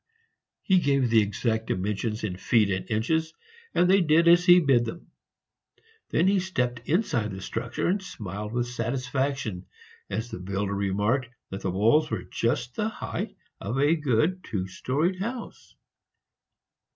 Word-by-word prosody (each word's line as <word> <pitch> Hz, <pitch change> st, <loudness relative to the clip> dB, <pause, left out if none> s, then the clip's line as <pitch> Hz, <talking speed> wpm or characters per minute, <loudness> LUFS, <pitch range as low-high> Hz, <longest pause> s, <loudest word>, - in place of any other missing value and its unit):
He 190 Hz, -2 st, +4 dB
gave 140 Hz, -6 st, +1 dB
the 115 Hz, -1 st, +6 dB
exact 110 Hz, +2 st, -1 dB
dimensions 105 Hz, +4 st, -2 dB
in 100 Hz, -4 st, -2 dB
feet 105 Hz, +2 st, +2 dB
and 95 Hz, 0 st, -3 dB
inches, 160 Hz, +9 st, 0 dB, 0.4 s
and 180 Hz, -, +4 dB
they 195 Hz, +1 st, +5 dB
did 165 Hz, +1 st, +4 dB
as 175 Hz, +1 st, +7 dB
he 175 Hz, 0 st, +9 dB
bid 135 Hz, -7 st, +3 dB
them. 165 Hz, +9 st, -8 dB, 1.0 s
Then 170 Hz, -, +2 dB
he 195 Hz, 0 st, +4 dB
stepped 125 Hz, -10 st, -1 dB
inside 145 Hz, -, +1 dB
the 95 Hz, -1 st, -6 dB
structure, -, -, -4 dB
and 190 Hz, +3 st, +1 dB
smiled 105 Hz, -, -6 dB
with 120 Hz, 0 st, 0 dB
satisfaction 125 Hz, -3 st, -2 dB, 0.4 s
as 110 Hz, +4 st, -3 dB
the -, -, -5 dB
builder 100 Hz, +2 st, -2 dB
remarked 105 Hz, +6 st, 0 dB, 0.2 s
that 95 Hz, -, -5 dB
the 95 Hz, -, -1 dB
walls 115 Hz, -, +3 dB
were -, -, -3 dB
just 120 Hz, +1 st, -1 dB
the 215 Hz, -, -1 dB
height -, -, -5 dB, 0.2 s
of 115 Hz, +7 st, -3 dB
a 145 Hz, +4 st, +4 dB
good 155 Hz, +5 st, +1 dB
two 95 Hz, -5 st, -3 dB
storeyed 150 Hz, -, -1 dB
house. 235 Hz, +4 st, -6 dB
125 Hz, 150 wpm, -26 LUFS, 105-160 Hz, 1.0 s, he